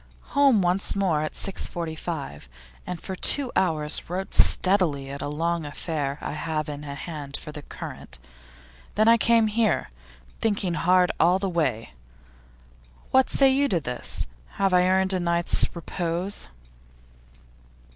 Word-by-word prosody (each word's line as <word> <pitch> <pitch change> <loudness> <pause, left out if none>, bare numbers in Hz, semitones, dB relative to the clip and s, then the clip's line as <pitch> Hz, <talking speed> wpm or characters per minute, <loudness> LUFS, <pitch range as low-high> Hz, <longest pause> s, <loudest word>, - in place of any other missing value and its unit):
Home 275 -8 +4
once 180 +2 0
more 185 -6 +1
at 155 - -4
6.45, 160 - -4 0.4
and 180 -2 -5
for 190 - -6
two 265 +6 +2
hours 155 -5 +2
wrote 185 +2 -4
steadily 165 -8 +3
at 140 0 -7
a - - -3
long 165 +3 -2
affair 145 -1 -4
I - - -4
have 155 0 -3
in 145 -1 -6
hand 145 0 -6
for 150 - -8
The 150 - -8
Current. 145 - -9 0.8
Then 215 +1 +3
I 230 0 +7
came 230 0 +3
here, 215 - 0 0.5
thinking 200 -5 0
hard 180 +3 +3
all 175 +3 +4
the 195 0 -2
way. 130 - -2 1.2
What 265 0 +4
say 275 -1 +5
you 280 +2 +2
to 175 - +1
this? 120 - -4 0.3
Have 195 -1 0
I 180 0 +4
earned 190 +1 +2
a 185 - 0
night's 170 -1 +3
repose? 175 +3 -3
170 Hz, 140 wpm, -25 LUFS, 150-195 Hz, 1.2 s, I